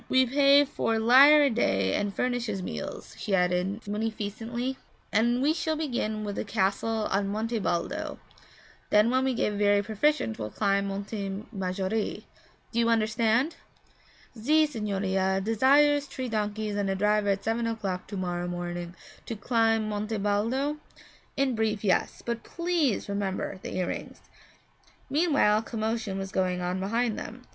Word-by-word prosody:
'We 260 0 +4
pay 280 +2 +5
four 225 -4 -1
lire 270 +7 +7
a 280 - +4
day 95 - +1
and 205 0 0
furnish 245 +2 -1
his 195 -3 -3
meals,' - - -6
she 200 - 0
added 180 +4 0
munificently. 225 +4 -3 0.3
'And 240 +4 +2
we 300 +2 +3
shall 320 -1 -1
begin 240 -8 -2
with 205 -1 -4
the - - -1
castle 210 +2 0
on 195 +1 +1
Monte 220 +3 -2
Baldo; 175 -3 -2 0.7
then 210 +3 +4
when 260 +1 +2
we 265 -1 0
get 210 - 0
very 205 0 +3
proficient 220 - 0
we'll 105 -1 -3
climb 200 - 0
Monte 200 0 -4
Maggiore. 195 +1 -2 0.5
Do 235 - -1
you 230 0 +3
understand?' 225 +5 +1 0.8
'Ze 305 +8 +3
signorina 195 -6 -1
desires 280 +7 +3
tree 260 -2 -5
donkeys 210 -1 -2
and 200 -1 -1
a 195 - 0
driver 210 +1 +2
at 195 0 0
seven 230 +1 0
o'clock 200 -5 -3
to 200 - -6
morrow 175 -1 -2
morning 175 0 -5 0.3
to 230 - -3
climb 225 0 +1
Monte 215 +1 -2
Baldo?' 230 +9 0 0.6
'In 275 -2 +2
brief, 220 -2 -1
yes, 190 -3 0
but 235 -1 -2
please 335 - -1
remember 200 -1 -3
the - - -6
earrings.' 180 -1 -4 0.9
Meanwhile 285 -9 +3
a - - -3
commotion 220 -3 -3
was 195 0 -5
going 185 -1 0
on 180 +1 -2
behind 225 +4 0
them. 250 +3 -8
215 Hz, 150 wpm, -27 LUFS, 195-240 Hz, 0.9 s, lire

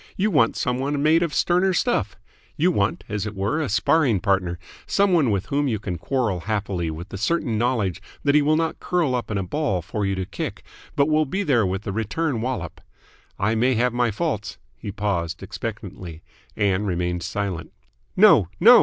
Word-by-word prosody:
You 210 +3 +1
want 115 -9 +3
some 125 0 -1
one 140 +1 -1
made 160 +2 +4
of 170 -3 0
sterner 180 +5 +2
stuff. - - 0 0.4
You 175 +4 +3
want, 100 - 0
as 105 0 -3
it 105 - -6
were, 105 +11 0
a 150 - -2
sparring 110 - +3
partner, 95 -3 0 0.3
some 200 -2 +2
one 155 -8 +4
with 100 -3 0
whom 145 +1 0
you 115 -4 0
can 95 -4 -5
quarrel 115 -5 -1
happily 95 -3 -2
with 80 +4 -7
the 100 - -7
certain 130 0 0
knowledge 110 -6 0 0.2
that 140 - +3
he 150 - +5
will 150 +2 +3
not 160 -1 -1
curl 170 -7 0
up 125 -1 -2
in 105 - -1
a 95 - -1
ball 100 - -1
for 100 +4 -3
you 100 0 0
to 95 0 -3
kick, - - -5 0.3
but 140 0 +3
will 155 -1 +2
be 195 +8 -1
there 120 - +2
with 95 +2 -3
the 100 - -3
return 115 +5 -1
wallop. 115 -10 -4 0.6
I 105 +3 +1
may 125 +3 +2
have 125 +2 +1
my 120 -1 +2
faults 110 - -3
" - - -39
He 100 - -7
paused 95 -5 -2
expectantly. 95 -6 -7 0.3
Ann 100 -1 +1
remained 90 -1 -1
silent. 95 -3 -3 0.5
"No, 185 - +7
no!" 240 +4 +9
110 Hz, 200 wpm, -23 LUFS, 95-145 Hz, 0.6 s, no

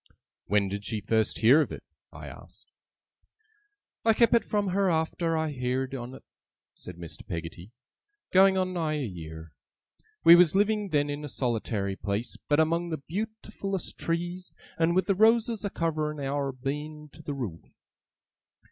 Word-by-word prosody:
'When 100 0 +2
did 100 +1 -4
she 110 0 -2
first 110 +1 0
hear 130 +8 +7
of - - -2
it?' - - -7 0.3
I - - -10
asked. - - -13 1.3
'I 225 -1 +4
kep 235 0 +4
it 235 - +5
from 205 -2 0
her 195 +1 +2
arter 165 0 0
I 160 -1 -1
heerd 130 0 -2
on 125 -1 -6
't,' - - -13 0.5
said 90 - -10
Mr. 85 -2 -8
Peggotty, 85 +4 -7 0.6
'going 190 +1 +6
on 185 0 0
nigh 160 -3 -1
a 145 -3 -2
year. 80 -5 -8 0.7
We 170 +1 +10
was 175 -1 +5
living 210 0 +2
then 145 -2 +1
in 145 +1 -5
a 145 - -5
solitary 110 -6 -1
place, 105 +4 -3
but 145 +1 +4
among 170 +2 +1
the 160 - -2
beautifullest 210 -1 -4
trees, 175 +2 -3 0.2
and 165 +1 +2
with 185 -1 +3
the 195 - +2
roses 225 +2 +3
a 200 - -1
covering 155 -4 -2
our 140 0 -1
Beein 150 +3 -5
to - - -13
the 145 -2 -5
roof. 105 -12 -7
150 Hz, 165 wpm, -28 LUFS, 120-185 Hz, 1.3 s, We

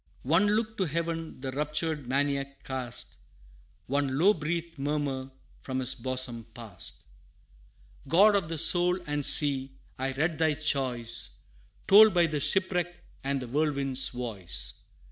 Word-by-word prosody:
One 165 +9 +3
look 220 0 -2
to 190 - +1
heaven 165 -2 -3
the 135 -1 -4
raptured 150 0 -2
Maniac 140 +1 -1
cast, 125 -3 -4 0.7
One 135 0 -1
low 190 +7 +5
breathed 165 -1 -4
murmur 140 -2 -2 0.3
from 130 -1 -4
his 130 0 0
bosom 125 -2 -3
passed: 110 -8 -9 1.0
'God 200 +8 +5
of 195 -5 +1
the 165 - -3
soul 175 +3 +3
and 145 -1 -2
sea! 135 -2 +3 0.3
I 135 +1 -1
read 160 +3 -1
thy 160 -2 +2
choice 125 -6 0 0.5
Told 210 0 +8
by 175 -1 +5
the 155 -2 -2
shipwreck 175 +1 0 0.2
and 140 0 -1
the - - -7
whirlwind's 140 -1 0
voice. 110 -8 -6
145 Hz, 135 wpm, -28 LUFS, 130-165 Hz, 1.0 s, Told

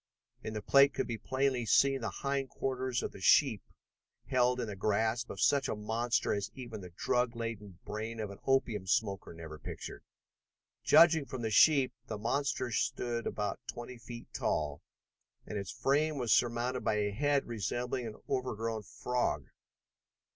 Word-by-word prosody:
In 110 - -5
the 105 - -4
plate 140 +4 +5
could - - 0
be 115 -2 -4
plainly 130 -2 0
seen 135 +4 +4
the 115 - -2
hind 140 -1 -2
quarters 130 -2 -2
of - - -3
the 95 - -12
sheep 110 +1 +5 0.6
held 125 0 +2
in 120 - -1
the 105 -2 -6
grasp 110 +4 0
of 95 - -7
such 140 +5 +3
a - - -1
monster 115 +3 0
as 100 -1 -2
even 120 -5 -7
the 90 - -9
drug 120 +7 0
laden 110 -5 -5
brain 110 +2 -5
of 105 -2 -3
an 100 - -11
opium 115 -7 +1
smoker 100 -2 0
never 80 -2 -9
pictured. - - -7 0.8
Judging 165 -3 +6
from 130 -2 -5
the 110 - -1
sheep, 135 +3 +5
the 110 - -4
monster 125 +2 -1
stood 120 +1 -1
about 105 -2 -2
twenty 120 +1 -7
feet 120 0 -9
tall, 75 -1 -1 0.6
and 105 - -4
its 100 - -6
frame 150 +2 +1
was 120 -4 +2
surmounted 120 +1 +1
by 110 - +1
a 105 -1 0
head 140 +6 +1
resembling 120 +3 -2
an 110 - -7
overgrown 115 -4 -2
frog. 105 - -2
120 Hz, 165 wpm, -32 LUFS, 105-130 Hz, 0.8 s, Judging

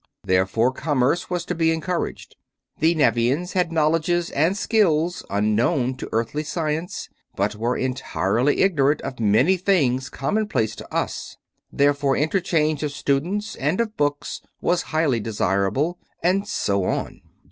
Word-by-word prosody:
Therefore 100 +6 +2
commerce 145 +3 0
was 175 -1 -2
to 180 - -2
be 165 -1 +2
encouraged. 160 +2 -3 0.4
The 165 +2 +3
Nevians 145 +3 +1
had 180 -3 +1
knowledges 165 +2 +1
and 165 +7 +1
skills 175 -7 +1
unknown 115 - +1
to - - -7
Earthly 115 +6 -1
science, 155 +2 -3 0.3
but 100 +2 0
were 115 +4 -1
entirely 130 -1 0
ignorant 150 -6 +3
of 130 - -6
many 115 - +3
things 140 -9 +1
commonplace 135 - -1
to - - -10
us. - - -3 0.3
Therefore 140 -1 +2
interchange 155 -2 +1
of 150 -2 -2
students 170 +10 -1
and 150 - 0
of 220 -2 -1
books 145 0 -2 0.2
was 175 0 +1
highly 155 -7 +1
desirable. 110 - 0 0.2
And 195 +4 +2
so 100 - 0
on. - - -3
150 Hz, 135 wpm, -23 LUFS, 125-175 Hz, 0.4 s, The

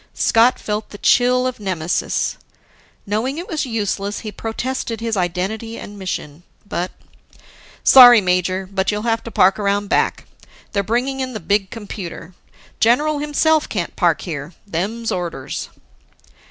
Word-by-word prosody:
Scott 235 +3 +4
felt 210 0 -3
the 205 - -10
chill 250 +3 +3
of 255 -2 -3
nemesis. 180 -5 -1 0.7
Knowing 225 +8 -1
it 345 - -5
was 305 -4 -2
useless, 205 -3 -2
he 215 - -6
protested 230 +2 -4
his 230 -1 -2
identity 195 +5 -2
and 205 0 -9
mission. 165 -5 -5 0.3
But, 180 -2 -2 0.9
"Sorry, 245 -3 +10
major. 185 0 0
But 190 0 -1
you'll 210 0 -1
have 225 -1 0
to - - -5
park 190 -2 +3
around 200 0 0
back. - - +1 0.5
They're 200 - +1
bringing 245 +6 -1
in 260 -1 -3
the 215 - -4
big 195 +2 0
computer. 185 -5 -8 0.5
General 290 +6 +3
himself 300 +1 +2
can't 180 -5 -3
park 170 -3 +2
here. 155 -1 -6
Them's 210 +6 -3
orders." 170 -7 -4
210 Hz, 140 wpm, -20 LUFS, 185-240 Hz, 0.9 s, Sorry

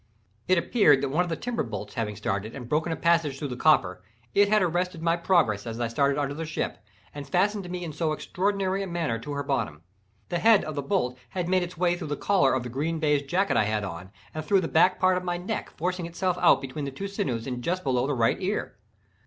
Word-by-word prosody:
It 185 - +4
appeared 170 - +4
that 140 - -1
one 160 +6 +2
of 180 - -5
the 165 - -1
timber 245 +4 -3
bolts 105 -4 -5
having 110 -4 -3
started 100 +3 -3
and 125 -4 -7
broken 155 +5 0
a - - 0
passage 165 -5 +2
through 145 0 -4
the 125 - -4
copper, 90 -11 +3 0.3
it 200 0 +4
had 215 -1 +4
arrested 180 0 -1
my 165 0 +3
progress 170 - +2
as 115 0 -5
I 120 - 0
passed 115 - -9 0.2
under 140 -1 -1
the 160 +3 -5
ship, 155 - -3 0.3
and 145 -1 -8
fastened 195 0 +1
me 180 0 -4
in 160 -3 -5
so 155 +1 -1
extraordinary 195 +4 -1
a 195 - -3
manner 165 -10 -2
to 145 +6 -6
her 140 0 -2
bottom. 110 - -2 0.5
The 175 - -1
head 220 +3 +5
of 155 - -5
the 145 - -2
bolt 130 -6 -1
had 180 -2 -3
made 185 0 +2
its 175 0 -5
way 175 0 +2
through 175 -3 -6
the 145 -1 -3
collar 165 -11 +3
of 130 - -1
the - - -5
green 150 +7 -2
baize 150 -2 +2
jacket 180 +8 0
I 110 - +3
had 105 0 -1
on, 90 -1 -6 0.2
and 155 - -4
through 195 +4 +3
the 165 - -2
back 180 +4 +3
part 185 -1 +3
of 180 - -3
my 175 -1 -1
neck, 195 +5 -4
forcing 180 +1 -2
itself 180 +1 -1
out - - +5
between 140 +1 -5
two 195 +9 -5
sinews 185 - -2
and 125 -2 -4
just 185 +4 -1
below 130 -1 +1
the 145 - 0
right 115 -2 +2
ear. 190 - -3
160 Hz, 245 wpm, -26 LUFS, 130-180 Hz, 0.5 s, head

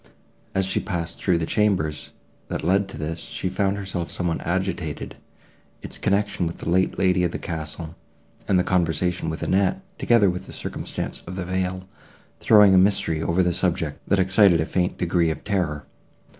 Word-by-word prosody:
As 95 0 +2
she 95 - 0
passed 85 -4 -3
through 90 -3 +2
the 80 - -1
chambers, 85 -7 0 0.4
that - - -4
led 95 +4 +2
to - - -8
this, 80 +2 -4
she 95 - -4
found 100 +1 0
herself 95 -4 -4
somewhat 85 -2 -1
agitated; 85 -3 -3 0.7
its - - -8
connection 100 -3 0
with 85 - -5
the - - -8
late 95 +1 +2
lady 90 -1 +2
of 90 - +2
the - - -4
castle, 80 0 -5 0.5
and 95 - +3
the 90 - +3
conversation 90 -1 0
of 80 - -5
Annette, 100 - +1 0.2
together 115 -4 +4
with 90 +1 -7
the - - -9
circumstance - - -5
of 90 - -6
the 95 -2 -4
veil, 95 0 -2 0.5
throwing 105 -3 +6
a 95 - +7
mystery 90 -5 +2
over 85 +3 +2
the 90 0 +1
subject, 85 -4 -1
that 100 - +3
excited 95 -1 +5
a 80 - +1
faint 90 +1 -1
degree 85 -1 +1
of 80 -2 -4
terror. 85 -8 -1
90 Hz, 180 wpm, -24 LUFS, 85-95 Hz, 0.7 s, a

